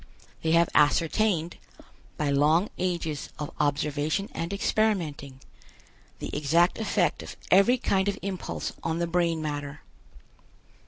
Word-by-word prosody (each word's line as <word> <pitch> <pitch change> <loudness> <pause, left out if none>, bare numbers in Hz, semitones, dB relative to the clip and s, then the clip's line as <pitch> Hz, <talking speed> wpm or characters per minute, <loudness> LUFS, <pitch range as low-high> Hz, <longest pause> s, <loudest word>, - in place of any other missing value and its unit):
They 160 0 +1
have 170 0 +5
ascertained, 165 +3 +2 0.6
by 145 -1 0
long 155 +7 +3
ages 170 -5 -2
of 150 -1 -5
observation 150 +5 0
and 165 +2 -4
experimenting, 170 -11 -1 0.8
the - - -6
exact 165 +7 +2
effect 220 - 0
of - - -9
every 200 +7 +6
kind 195 -4 0
of 200 - -1
impulse 190 -2 -4
on 165 0 -2
the 170 - 0
brain 170 -2 0
matter. 145 -1 -5
165 Hz, 120 wpm, -27 LUFS, 150-190 Hz, 0.8 s, every